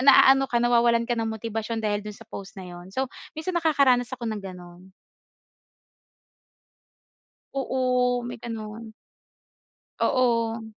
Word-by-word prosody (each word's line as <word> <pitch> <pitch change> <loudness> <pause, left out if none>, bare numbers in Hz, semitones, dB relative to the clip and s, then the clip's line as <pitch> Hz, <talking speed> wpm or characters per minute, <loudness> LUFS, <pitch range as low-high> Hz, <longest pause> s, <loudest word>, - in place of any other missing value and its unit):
naano 270 0 +7
ka, 240 - 0
nawawalan 235 -1 +4
ka 240 - -1
ng 225 -1 -1
motibasyon 225 +1 -3
dahil 205 -1 +1
do'n 210 0 -8
sa 225 - -13
post 195 -1 -9
na 190 - -7
'yon. 175 +1 -10
So, 260 +7 -1 0.3
minsan 320 +4 -3
nakakaranas 275 -6 +3
ako 235 - -7
ng 210 - -4
gano'n. 180 0 -11 2.6
Oo, 250 -2 +1
may 245 0 -6
gano'n. 225 -1 -6 1.1
Oo. 230 -3 +1
230 Hz, 120 wpm, -26 LUFS, 210-250 Hz, 2.6 s, naano